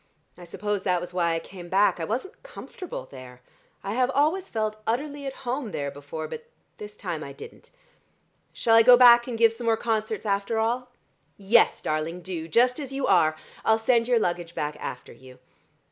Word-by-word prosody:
I 175 - -12
suppose 205 +3 -3
that 180 -2 +1
was 175 +1 -8
why 170 -2 +1
I - - -1
came 175 +1 -11
back. 195 0 +3
I 165 - -2
wasn't 265 - -4
comfortable 365 - -9
there. 125 -2 -12 0.4
I 200 - -3
have 250 +1 +1
always 320 +7 +1
felt 215 -1 -2
utterly 280 +4 -2
at 270 - -4
home 250 0 -2
there 140 -6 -4
before, 145 +3 -7
but 470 +1 -9 0.3
this 210 0 -9
time 170 -5 -5
I 140 - -8
didn't. - - -13 0.8
Shall 225 -1 +2
I 230 - +8
go 245 +2 +8
back 240 -1 +7
and 240 -2 -4
give 230 0 +4
some 235 +1 -8
more 225 -1 +2
concerts 220 -1 -2
after 200 +2 -1
all?" 240 +3 -1 0.5
"Yes, 205 +4 +3
darling, 160 +3 -3
do: 170 -3 -5
just 250 - +2
as 275 -3 -6
you 270 0 -2
are. 160 -4 +3 0.3
I'll 220 - +3
send 230 +1 +2
your 245 -1 +3
luggage 175 -5 -2
back 150 0 -3
after 125 - -7
you. 130 -1 -16
215 Hz, 190 wpm, -25 LUFS, 170-245 Hz, 0.8 s, I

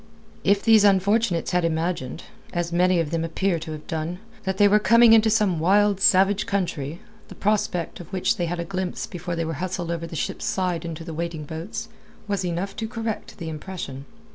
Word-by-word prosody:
If 200 0 +3
these 220 -2 +6
unfortunates 200 -1 +2
had 180 -1 +2
imagined 165 -3 -2 0.3
as 175 -1 -2
many 180 0 +3
of 160 -2 -1
them 165 -1 0
appear 170 +2 0
to 160 0 -7
have 155 -1 -7
done 160 +2 -3 0.3
that 190 0 -1
they 205 - +6
were 210 +1 +5
coming 230 +1 +6
into 220 0 +6
some 210 -6 +2
wild, 200 +3 +3
savage 195 +1 +4
country, 170 -6 -2 0.3
the - - -11
prospect, 195 -4 -1
of 175 -1 -11
which 185 -2 +1
they 175 - -1
had 175 +1 -3
a 170 - -2
glimpse 185 0 -3
before 175 0 -5
they 165 0 -1
were 165 - -3
hustled 180 -2 -3
over 165 0 -3
the 165 - -8
ship's - - -3
side 180 -3 -1
into 165 0 -5
the 165 -1 -7
waiting 165 -1 -4
boats, 165 +9 -6 0.4
was 200 -2 -1
enough 180 +2 -3
to 220 - -3
correct 225 -1 -5
the 170 - -6
impression. 155 -4 -6
180 Hz, 200 wpm, -24 LUFS, 165-200 Hz, 0.4 s, these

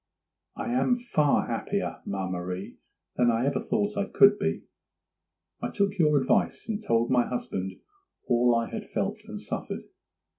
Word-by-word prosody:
'I 240 - -3
am 250 0 +3
far 155 - +2
happier, - - -2
ma 95 -1 -2
Marie, 90 +1 -5 0.4
than 120 -1 +4
I 115 +2 +2
ever 140 - +1
thought 210 -1 -1
I 200 0 -1
could 205 +1 +6
be. 200 0 -1 1.0
I - - -2
took 200 -1 0
your 150 -3 +5
advice, 130 +8 +1
and 220 -1 -2
told 115 - +1
my 125 -1 +3
husband 95 -6 -3 0.5
all 120 0 +4
I 115 0 +1
had - - -4
felt - - -2
and - - -6
suffered. - - -5
135 Hz, 155 wpm, -27 LUFS, -, 1.0 s, could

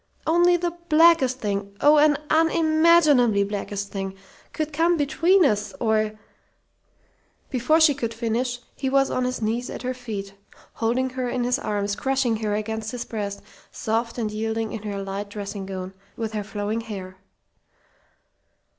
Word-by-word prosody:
Only 350 +2 +4
the 345 0 -1 0.2
blackest 315 -5 +5
thing 200 -2 -3
oh, 300 +1 +6
an 295 -1 +5
unimaginably 315 -8 +4
blackest 200 0 -4
thing! 195 -1 -4 0.4
could 310 -1 -3
come 335 +3 +2
between 330 +5 +3
us, 210 0 0
or 215 -2 +1 0.7
" - - -40
Before 270 +5 +2
she 315 -2 +6
could 235 -5 -3
finish, 235 +2 -2 0.2
he 270 - -2
was 275 0 +2
on 255 - 0
his 250 -2 -3
knees 230 +3 -1
at - - -7
her 255 +1 -1
feet, 210 -6 -6 0.4
holding 250 +3 0
her 255 -1 -3
in 245 0 -1
his 250 +2 +1
arms, 205 -1 -2
crushing 265 -3 0
her 215 -1 -1
against 220 +1 -3
his 245 +1 -5
breast, 205 -3 -5 0.3
soft 230 +2 -2
and 220 -3 -2
yielding 220 +1 -2
in 225 - -5
her 200 -1 -4
light 195 +1 -5
dressing 200 -1 -6
gown, 190 -1 -6 0.2
with 225 -1 -4
her 210 -1 -2
flowing 210 +2 -3
hair. 190 -4 -8
230 Hz, 155 wpm, -24 LUFS, 210-275 Hz, 0.7 s, oh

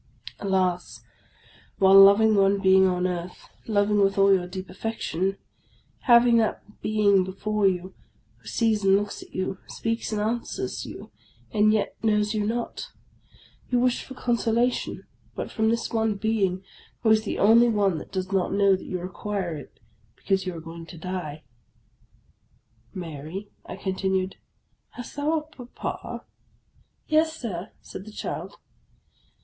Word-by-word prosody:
Alas! 185 -2 -1 0.8
while 190 -1 +5
loving 200 +3 +7
one 200 0 +3
being 190 -1 +5
on 180 0 0
earth, 180 -1 -5 0.2
loving 205 -1 +2
with 195 0 +2
all 195 0 +6
your 180 -2 +1
deep 185 +1 -7
affection, 195 -2 -3 0.7
having 235 -1 +6
that 215 -1 -2
being 205 -3 +3
before 200 +2 0
you, 185 0 -2 0.4
who - - -19
sees 220 -3 +1
and 195 0 +5
looks 205 0 -2
at - - -13
you, 185 +1 -2
speaks 230 -1 -3
and 215 - -1
answers 230 +3 -3
you, - - -10 0.4
and 215 0 +4
yet 215 -1 0
knows 210 -1 +2
you 215 -1 0
not! 235 - -3 0.8
You 250 - +2
wish 250 0 +1
for 265 - -10
consolation 240 0 0 0.3
but - - -5
from 220 -1 +1
this 230 +1 -1
one 220 -2 +1
being, 195 -3 0 0.4
who 220 - +4
is 215 0 +4
the 215 - -3
only 230 +4 +6
once 200 -6 +1
that - - -11
does 185 0 -3
not 190 -2 +1
know 200 -1 +4
that 185 - -9
you 180 - -3
require 185 -1 -4
it 145 - -11 0.4
because 190 -1 -1
you 180 - -3
are - - -6
going 165 0 -9
to 170 - -11
die! 160 -3 -5 0.8
" - - -40 0.7
Mary," 170 +3 -7 0.2
I - - -6
continued, 190 0 -1 0.3
" - - -45
hast 245 - -8
thou 305 +1 0
a 245 - -7
papa? - - -6 0.2
" - - -38
" - - -45
Yes, 315 +1 +2
Sir," 190 -6 -5
said 190 - -9
the 215 - -10
child. - - -5
200 Hz, 155 wpm, -25 LUFS, 185-220 Hz, 0.8 s, loving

